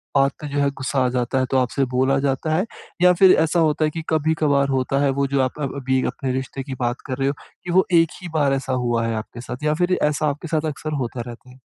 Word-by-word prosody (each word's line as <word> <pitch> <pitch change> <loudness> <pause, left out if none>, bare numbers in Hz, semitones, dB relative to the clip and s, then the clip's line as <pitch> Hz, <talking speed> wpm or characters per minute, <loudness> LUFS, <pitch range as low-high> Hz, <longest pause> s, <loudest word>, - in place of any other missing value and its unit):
बात 135 0 +4
पे 150 - -5
जो - - -1
है 140 0 +3
ग़ुस्सा 135 0 -2
आ - - +2
जाता 125 +1 0
है, 130 - +1
तो 135 - +3
आपसे 130 +2 +1
बोला 130 +2 +2
जाता 140 +3 0
है? 185 - +1 0.4
या 180 0 +7
फिर 190 -1 +8
ऐसा 165 +2 +1
होता 155 -1 +2
है - - +1
कि 165 - -4
कभी-कभार 155 -3 +2
होता 135 0 0
है, 140 - +3
वो 140 +1 0
जो 140 0 +1
आप 130 +3 -2
अ - - -2
अ 140 - +1
अभी 130 -1 0
अपने 130 -2 -3
रिश्ते 130 +1 -4
की 135 -1 -6
बात 120 0 -1
कर 130 -2 -4
रहे 135 - 0
हो, 140 - +1 0.3
कि 180 - -4
वो 185 +2 +4 0.2
एक 165 - -1
ही 180 - -6
बार 145 -3 +2
ऐसा 135 -1 -2
हुआ 115 -1 +1
है 115 - -1
आपके 110 +2 -6
साथ, 125 +3 -7
या 150 0 +2
फिर 180 +3 +1
ऐसा 150 +1 +1
आपके 150 +4 -5
साथ 155 0 0
अक्सर 155 +1 -6
होता 120 0 -5
रहता 120 +1 -11
है? 130 - -16
140 Hz, 275 wpm, -22 LUFS, 130-155 Hz, 0.4 s, फिर